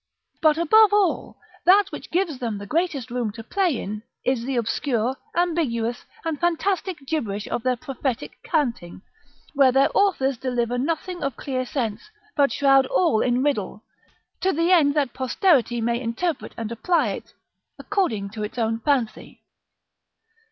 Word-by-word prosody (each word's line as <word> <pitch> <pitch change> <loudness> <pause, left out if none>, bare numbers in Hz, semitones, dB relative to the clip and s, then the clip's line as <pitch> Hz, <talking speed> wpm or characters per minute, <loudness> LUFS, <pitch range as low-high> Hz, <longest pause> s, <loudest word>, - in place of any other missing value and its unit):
But 310 -1 +4
above 415 +5 +5
all, 405 -4 +1 0.3
that 395 +2 +5
which - - -8
gives 340 -6 -1
them 230 -5 -3
the 200 - -7
greatest 300 - -1
room 240 -3 -1
to 225 0 -9
play 360 - 0
in, 210 +2 -5 0.2
is 250 -2 +1
the 265 +2 -2
obscure, 240 +1 0 0.2
ambiguous, 290 -10 0 0.2
and 320 -3 -2
fantastic 345 -2 -1
gibberish 225 -9 -2
of - - -2
the 255 +1 0
prophetic 265 -2 -4
canting, 235 - -2 0.5
where 275 -3 +5
their 270 +2 +4
authors 275 -10 +2
deliver 245 -1 -1
nothing 330 +5 -2
of 275 -4 -2
clear 255 -2 -3
sense, 235 - -3 0.3
but 285 -3 +3
shroud 270 -1 +4
all 325 -11 +2
in 250 +1 +1
riddle, 215 -7 -1 0.6
to 380 - +2
the 335 +2 +1
end 305 -5 +5
that 285 -4 +1
posterity 260 - +2
may 235 +1 0
interpret 275 +8 -3
and 225 -1 -4
apply 295 - +1
it 195 - -7 0.4
according 220 - -1
to 215 0 -6
its 210 +3 -5
own 225 -1 0
fancy. 245 -3 -2
270 Hz, 150 wpm, -23 LUFS, 235-330 Hz, 0.6 s, above